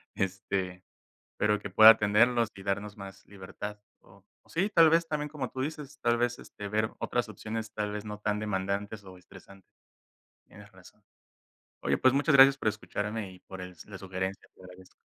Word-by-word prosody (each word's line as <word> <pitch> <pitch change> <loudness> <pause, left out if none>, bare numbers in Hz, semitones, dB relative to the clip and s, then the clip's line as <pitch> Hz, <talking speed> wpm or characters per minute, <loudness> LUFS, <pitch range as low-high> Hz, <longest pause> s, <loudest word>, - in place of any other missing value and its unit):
este, 95 -1 -3 0.5
pero 105 0 +1
que 100 - -7
pueda 110 +3 +10
atenderlos 115 +2 +3
y 95 - -11
darnos 100 +1 -3
más 100 -1 -11
libertad 100 +1 -8 0.2
o 95 0 -21 0.2
o - - -27
sí, 185 +5 0
tal 165 -1 +7
vez 165 +1 +3
también 150 -2 -3
como 145 -4 -5
tú 130 - -6
dices, 145 0 -5
tal 120 0 +3
vez, 120 0 -1
este, 105 - -9
ver 110 +2 0
otras 120 -1 -1
opciones, 110 +2 -6
tal 105 -1 -3
vez 105 0 -5
no 105 -1 -7
tan 105 0 -1
demandantes 100 0 -3
o 95 -1 -12
estresantes. 95 +1 -17 0.8
Tienes 100 +1 -15
razón. 95 -1 -18 0.8
Oye, - - 0
pues 130 0 +4
muchas 140 +1 +3
gracias 135 0 +8
por - - -2
escucharme 105 -1 -3
y 90 - -16
por 95 0 -11
el 90 0 -8
s 90 - -15
la 100 - -8
sugerencia. 95 0 -5
Te - - -20
agradezco. 90 0 -15
105 Hz, 185 wpm, -29 LUFS, 95-120 Hz, 0.8 s, pueda